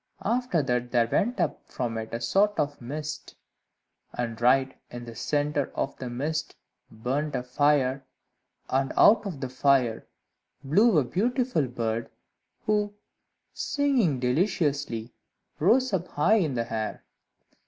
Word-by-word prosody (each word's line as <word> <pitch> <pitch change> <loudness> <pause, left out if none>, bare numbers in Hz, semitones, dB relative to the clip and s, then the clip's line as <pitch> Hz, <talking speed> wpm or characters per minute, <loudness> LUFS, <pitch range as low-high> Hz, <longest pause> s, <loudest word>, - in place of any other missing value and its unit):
After 230 - +1
that 125 -2 -1
there 120 -2 +2
went 235 - 0
up - - 0
from 120 -3 -3
it 110 0 -7
a 115 - -3
sort 200 - +2
of 145 -2 -1
mist, 150 +5 -6 0.8
and 115 -2 -4
right 130 +2 +3
in 120 0 -8
the 115 - -8
centre 145 +5 -1
of 135 - -2
the 130 - -5
mist 150 +6 -3 0.3
burnt 135 +7 -2
a 125 - -1
fire, 135 0 +2 0.6
and 135 0 0
out 210 -1 +6
of 160 -8 -6
the 130 - -3
fire 130 -3 +2 0.6
flew 200 - +4
a 150 - +4
beautiful 220 - 0
bird, 115 -2 -2 0.6
who, 210 -1 +1 0.6
singing 255 - +1
deliciously, 140 - 0 0.5
rose 250 - +3
up 180 -1 0
high 180 +10 +3
in 155 -10 0
the 115 -1 -3
air. 110 -1 -3
140 Hz, 135 wpm, -27 LUFS, 125-180 Hz, 0.8 s, out